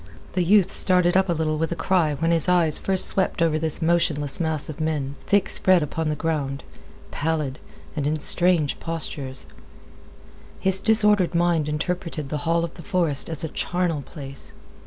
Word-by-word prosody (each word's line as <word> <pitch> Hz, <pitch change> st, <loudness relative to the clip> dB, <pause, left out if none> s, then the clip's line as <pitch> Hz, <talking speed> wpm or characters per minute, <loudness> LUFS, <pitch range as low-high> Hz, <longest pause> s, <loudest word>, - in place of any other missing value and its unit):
The 185 Hz, -, 0 dB
youth 195 Hz, +1 st, +2 dB
started 180 Hz, -1 st, +7 dB
up 190 Hz, 0 st, +2 dB
with 170 Hz, -3 st, -2 dB
a -, -, 0 dB
little 155 Hz, +2 st, -2 dB
cry 170 Hz, -6 st, 0 dB
when 165 Hz, +3 st, -1 dB
his 165 Hz, +1 st, 0 dB
eyes 170 Hz, -4 st, +3 dB
first 190 Hz, -1 st, +5 dB
swept 190 Hz, -1 st, +4 dB
over 160 Hz, -2 st, 0 dB
this 160 Hz, +1 st, -2 dB
motionless 155 Hz, -4 st, -1 dB
mass 160 Hz, -3 st, -1 dB
of 155 Hz, 0 st, -8 dB
men, 150 Hz, -3 st, -3 dB
thick 200 Hz, -1 st, +1 dB
spread 185 Hz, -3 st, +3 dB
upon 155 Hz, +2 st, -4 dB
the 150 Hz, -, -2 dB
ground, 145 Hz, -4 st, -4 dB, 0.5 s
pallid, 150 Hz, -3 st, -3 dB, 0.4 s
and 145 Hz, -2 st, -3 dB
in 155 Hz, +1 st, -1 dB
strange 170 Hz, -2 st, +2 dB
postures. 145 Hz, -5 st, -5 dB, 1.1 s
His 190 Hz, 0 st, +2 dB
disordered 210 Hz, -4 st, +2 dB
mind 170 Hz, -3 st, 0 dB
interpreted 160 Hz, -1 st, -5 dB
the 150 Hz, -, -3 dB
hall 170 Hz, 0 st, +1 dB
of 170 Hz, -, -6 dB
the 170 Hz, -, -13 dB
forest 170 Hz, -8 st, 0 dB
as 160 Hz, -1 st, -3 dB
a -, -, -2 dB
charnel 175 Hz, -2 st, -3 dB
place. 140 Hz, -1 st, -8 dB
165 Hz, 170 wpm, -22 LUFS, 150-180 Hz, 1.1 s, started